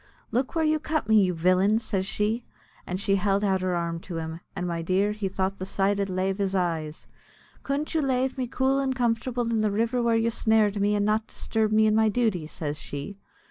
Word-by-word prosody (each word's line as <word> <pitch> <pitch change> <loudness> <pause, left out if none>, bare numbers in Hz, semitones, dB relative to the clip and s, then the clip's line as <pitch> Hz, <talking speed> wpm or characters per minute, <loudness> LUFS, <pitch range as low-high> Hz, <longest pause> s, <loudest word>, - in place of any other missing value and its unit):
"Look 250 +7 -1
where 325 -1 +2
you 310 0 +2
cut 310 -6 -2
me, 220 -1 +6
you 180 -2 +1
villain," 185 +5 +3
says 195 -4 -2
she, 215 +4 -1 0.4
and 180 +1 -3
she 195 0 +2
held 195 +1 +1
out 190 -2 +1
her 185 -1 0
arm 170 -1 -2
to 170 0 -7
him 160 0 -5 0.2
and, 185 -2 -3
my 170 -1 -2
dear, 190 +5 +1
he 210 -2 -3
thought 190 +1 -2
the 185 - -4
sight 195 +1 0
id 200 -1 -1
lave 190 +1 -1
his 195 -1 0
eyes. 165 -4 -2 0.6
"Couldn't 285 +4 -2
you 320 - +2
lave 260 -1 0
me 255 -2 -2
cool 265 +2 +1
and 265 -1 0
comfortable 240 0 0
in 230 -1 0
the 215 - +2
river 230 +4 0
where 235 -1 +2
you 225 +1 +2
snared 215 -3 +2
me, 205 +1 +2
and 205 0 +1
not 215 +1 +1
disturb 220 -1 -1
me 215 0 +4
in 215 - +3
my 220 0 +4
duty?" 205 -8 0
says 150 -1 -4
she. 145 +8 -7
210 Hz, 225 wpm, -26 LUFS, 185-230 Hz, 0.6 s, me